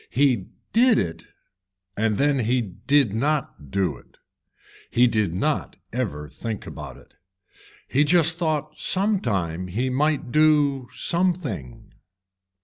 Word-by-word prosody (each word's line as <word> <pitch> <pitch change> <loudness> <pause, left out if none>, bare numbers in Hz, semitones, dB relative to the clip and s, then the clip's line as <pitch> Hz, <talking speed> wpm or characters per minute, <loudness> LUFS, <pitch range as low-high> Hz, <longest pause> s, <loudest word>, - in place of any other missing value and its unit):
He 125 -8 +2 0.3
did 240 +1 +5
it 85 -2 -2 0.7
and 105 -1 0
then 145 -1 +2
he 125 +2 +1
did 120 +3 +1
not 135 - -2
do 90 -3 0
it, - - -22 0.7
he 120 - +4
did 110 -6 +1
not 150 +11 -1 0.2
ever 95 -12 -3
think 110 +6 -6
about - - -8
it. - - -20 0.7
He 145 - +3
just 165 +1 +3
thought 155 -4 -2
some 200 +2 +2
time 90 - -2
he 120 +8 -1
might 145 -1 0
do 145 -3 +3
something. 165 - -2
130 Hz, 125 wpm, -24 LUFS, 100-155 Hz, 0.7 s, did